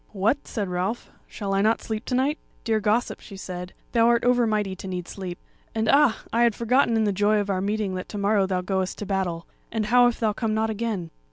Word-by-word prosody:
"What!" 220 +8 0
said 205 -4 -2
Ralph; 180 +6 -3 0.2
"shall 200 -2 -4
I 195 - +2
not 220 +2 +3
sleep 220 0 -4
to 255 - -1
night?" 275 +4 +1 0.2
"Dear 220 -1 +1
gossip," 215 +3 0
she 195 - -11
said, 180 -1 -6 0.2
"thou 230 -1 +4
art 235 0 +3
over 245 -1 +4
mighty 210 -3 0
to 190 - -8
need 180 -2 -4
sleep. 185 -3 -6 0.4
And 220 0 0
ah! 280 -3 +4
I 230 - +3
had 235 -3 +4
forgotten 235 0 +2
in 220 - +2
the 210 - +2
joy 205 +2 +2
of 200 -1 -1
our 185 -1 0
meeting 205 -1 -1
that 185 0 -5
to 210 - -5
morrow 200 -1 +2
thou 185 -1 0
goest 190 0 -2
to 210 - -5
battle; 185 -4 -2 0.3
and 220 -1 -1
how 245 +3 +6
if 240 - -1
thou 220 -2 +1
come 220 0 -1
not 220 0 +1
again?" 210 -6 -3
210 Hz, 240 wpm, -25 LUFS, 190-230 Hz, 0.4 s, how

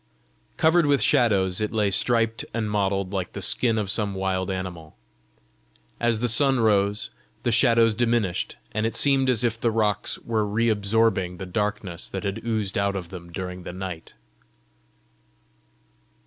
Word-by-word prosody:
Covered 160 0 +4
with 140 -1 +3
shadows 100 -8 +2
it 105 - -1
lay 105 -3 +1
striped 115 +2 +1
and 110 -2 -2
mottled 100 -2 -1
like 95 -3 -3
the - - -5
skin 115 -3 +1
of 100 -3 -1
some 100 -2 -1
wild 95 -1 -1
animal. 90 -6 -6 1.0
As 120 -2 +1
the 120 - +2
sun 135 +3 +4
rose 105 -2 +1 0.3
the 120 - +1
shadows 115 -1 +4
diminished, 115 -5 0
and 110 +1 0
it 115 - -5
seemed 135 +1 +3
as 125 -2 +2
if 115 -1 -1
the 120 - +2
rocks 105 -3 0
were 110 -2 -1
re 110 +3 0
absorbing 105 -3 +1
the 95 - -6
darkness 100 -2 -3
that 95 - -5
had 100 -1 -4
oozed 110 -4 -1
out 100 0 0
of 90 -3 -5
them 85 -2 -10
during 90 +1 -6
the 90 - -8
night. 90 -3 -7
105 Hz, 160 wpm, -24 LUFS, 95-115 Hz, 1.0 s, Covered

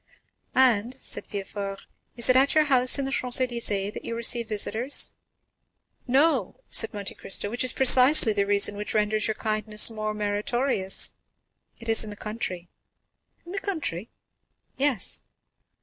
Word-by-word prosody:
"And," 250 -2 +2
said - - -8
Villefort, 200 0 -7 0.3
"is 235 -1 +3
it 255 - +4
at 270 +3 +3
your 310 - +4
house 255 -3 +3
in 275 - -3
the 270 - -5
Champs 250 -1 +1
Élysées 230 -5 -2
that - - -9
you 230 - -6
receive 235 0 -1
your 215 - -2
visitors?" 240 +6 +2 1.0
"No," 270 - 0
said 225 - +3
Monte 200 -1 -6
Cristo, 205 +1 -3
"which 240 - -1
is 255 - +2
precisely 255 -2 +6
the 200 -1 -1
reason 205 0 +3
which 210 +1 -5
renders 215 0 0
your 220 - -3
kindness 215 0 +2
more 215 -1 -5
meritorious,—it 210 +1 -3
is 225 0 +2
in 215 - -9
the 205 - -9
country." 200 -5 -7 0.8
"In 345 - -11
the 395 - -4
country?" 290 - -5 0.7
"Yes." 265 -7 +1
225 Hz, 150 wpm, -24 LUFS, 205-255 Hz, 1.0 s, precisely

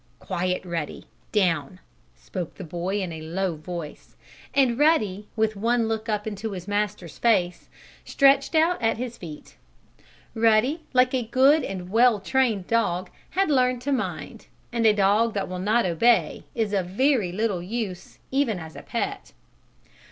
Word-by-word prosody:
"Quiet, 180 +1 -2
Ruddy! 165 -4 -4 0.3
Down!" 180 -5 0 0.4
spoke 175 -3 -6
the 195 - -8
boy 180 +4 -3
in 180 - -4
a 160 -1 -7
low 175 +2 -2
voice, 155 0 -8 0.4
and 260 -3 +2
Ruddy, 210 - +2
with 220 -1 +1
one 230 +3 +1
look 225 0 -3
up 210 -1 -1
into 215 0 -4
his 180 0 -7
master's 205 -6 -3
face 180 -7 +1 0.3
stretched 275 +3 +3
out 325 +1 +3
at 225 -1 +1
his 240 0 -5
feet. 155 -4 -10 0.8
Ruddy, 230 +7 +3
like 255 0 +3
a 260 - +1
good 275 +5 +4
and 185 -5 -6
well 230 0 +4
trained 220 -2 +1
dog, 185 -5 0 0.3
had 390 -5 +3
learned 250 -2 +2
to 285 - -1
mind, 265 - -3 0.3
and 230 -1 +3
a 215 - +6
dog 210 +3 +2
that 200 - -1
will 185 0 -5
not 215 +4 +2
obey 205 +8 +2
is 220 -3 -1
of 190 -3 0
very 225 -1 +1
little 200 -2 -1
use, 195 -1 -5
even 265 -6 +1
as 160 -2 -9
a - - -8
pet. - - -4
210 Hz, 160 wpm, -25 LUFS, 180-240 Hz, 0.8 s, a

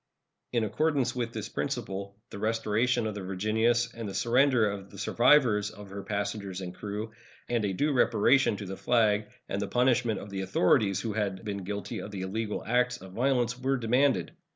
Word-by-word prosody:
In 120 -2 +1
accordance 145 +4 0
with 120 -2 -2
this 110 -2 -5
principle, 100 -7 -4
the - - -7
restoration 115 +2 +1
of 110 - -2
the 100 - -6
Virginius 110 +5 +1
and 115 -3 -5
the 95 - -7
surrender 125 -1 +3
of 100 -1 -5
the 100 - -13
survivors 115 -1 +4
of 100 -1 -12
her 100 0 -5
passengers 100 -2 -3
and 90 -1 -6
crew, 105 +3 -5 0.4
and 120 -2 0
a 100 - 0
due 145 +9 +1
reparation 135 -2 +3
to 100 - -6
the 95 0 -5
flag, 110 -3 +2 0.2
and 100 - -2
the 100 - -2
punishment 120 -1 +2
of 100 - -9
the 95 -1 -3
authorities 95 +1 +2
who 110 -2 -3
had 100 -2 -2
been 100 -2 -4
guilty 100 +1 -4
of - - -6
the 100 -2 -6
illegal 105 +3 -3
acts 125 +1 +1
of 95 -5 -12
violence, 125 0 +1
were 135 +1 +1
demanded. 125 - +2
110 Hz, 190 wpm, -29 LUFS, 100-120 Hz, 0.4 s, survivors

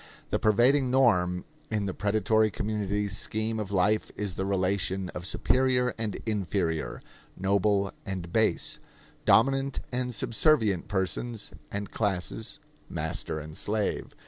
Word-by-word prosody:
The - - +1
pervading 125 +5 +4
norm 90 -9 +3 0.2
in 105 -2 -1
the 95 - -2
predatory 110 +1 +2
community's 105 0 -2
scheme 110 +1 0
of 105 -2 -4
life 100 +3 +2
is 100 -3 -3
the 95 - -2
relation 95 -1 0
of 90 +1 -6
superior 125 +2 +2
and 110 -3 -3
inferior, 95 -6 -1 0.3
noble 100 +1 +2
and 90 -3 -5
base, 110 -1 +1 0.5
dominant 135 +3 +4
and 125 0 -1
subservient 115 - +2
persons 105 +3 -1 0.2
and 100 -1 -4
classes, 105 +2 -1 0.3
master 80 - -2
and 75 +1 -9
slave. 105 +3 -2
105 Hz, 120 wpm, -28 LUFS, 95-115 Hz, 0.5 s, pervading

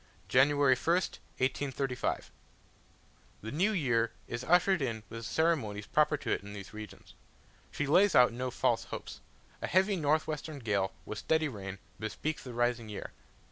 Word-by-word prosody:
January 140 +1 +5
1st 170 +7 0 0.2
1835. 135 0 -1 1.1
The 110 - -5
new 185 +8 +2
year 120 - +1 0.2
is 120 +1 -4
ushered 180 +3 +4
in 115 -5 -2
with 115 - -6
the 115 - -6
ceremonies 125 -12 +1
proper 150 +3 +3
to - - -4
it - - +1
in 100 +1 -9
these 100 -4 -9
regions. 105 0 -10 0.6
She 150 - -2
lays 185 +8 +4
out 125 -1 +6
no 125 +2 -2
false - - +1
hopes: - - -7 0.4
a - - -2
heavy 190 +2 +3
north 155 0 +2
western 155 0 -4
gale, 100 -6 0
with 105 - -5
steady 160 -1 +2
rain, 100 -6 -6 0.2
bespeaks 140 +7 -3
the 125 - -7
rising 120 -2 0
year. 105 - -6
130 Hz, 160 wpm, -31 LUFS, 115-155 Hz, 1.1 s, out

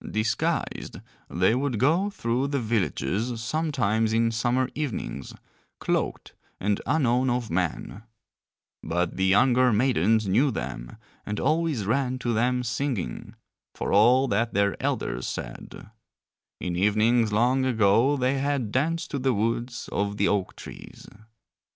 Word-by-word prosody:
Disguised 110 +1 -2 0.3
they 95 +5 +2
would 130 -1 -1
go 165 - +2
through 125 - -1
the 140 0 -1
villages 110 - -1
sometimes 115 -5 0
in 115 0 +2
summer 120 +3 0
evenings, 120 - -5 0.4
cloaked - - -2 0.3
and 105 +1 0
unknown 130 -3 +2
of 120 -2 -2
men; 90 +3 -2 0.8
but 85 +1 -2
the 95 0 +1
younger 125 +6 +4
maidens 110 -2 +2
knew 120 +10 +3
them - - -6 0.3
and 105 0 -4
always 155 - 0
ran 130 +3 0
to 120 -2 -2
them 125 +3 +1
singing, 120 - -3 0.4
for - - -3
all 125 +6 +5
that 115 +1 0
their 100 0 +2
elders 60 +1 -2
said: - - -8 0.7
in 90 -1 -3
evenings 110 +4 +2
long 125 +5 +2
ago 115 +3 +3
they 130 +1 0
had 140 -6 -1
danced 165 +7 -1
to 140 - -2
the 130 -2 +1
woods 115 +3 -2
of 100 0 -2
the 100 - +2
oak 100 -3 -1
trees. - - -11
115 Hz, 130 wpm, -26 LUFS, 105-130 Hz, 0.8 s, all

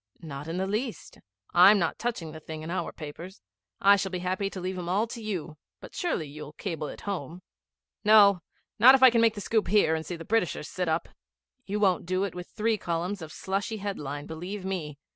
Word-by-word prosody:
'Not 145 -2 -8
in 165 +2 -3
the 190 - 0
least. 215 +5 -4 0.3
I'm 190 +4 +8
not 170 -4 -1
touching 220 -10 -3
the 160 - -9
thing 155 0 -8
in 165 - -5
our 185 - -2
papers. 165 +5 -9 0.4
I 200 +1 +6
shall 195 0 -2
be 185 - -3
happy 190 +2 -1
to 195 - -7
leave 185 +1 -4
'em 175 -1 -5
all 200 +5 +2
to 235 0 -8
you; 175 -7 -4 0.2
but - - -12
surely 335 - -2
you'll 150 +1 -9
cable 160 -3 -4
it - - -9
home?' 180 -3 -5 0.6
'No. 205 -4 +7 0.4
Not 255 +5 +9
if 265 - +2
I 260 - +10
can 230 -1 +3
make 225 -1 +4
the 205 - -5
scoop 220 0 0
here 195 -4 +4
and 160 0 -1
see 175 - -5
the 165 0 -9
Britishers 190 -8 0
sit 180 -1 -3
up.' 160 +1 -1 0.6
'You 205 +2 -2
won't 185 -5 +2
do 185 +1 0
it 200 - -3
with 180 0 -7
three 220 0 -1
columns 175 +3 -2
of 160 -1 -8
slushy 195 +5 -3
headline, 150 -8 -5
believe 185 +5 -6
me. 165 -7 -4
185 Hz, 220 wpm, -28 LUFS, 160-205 Hz, 0.6 s, I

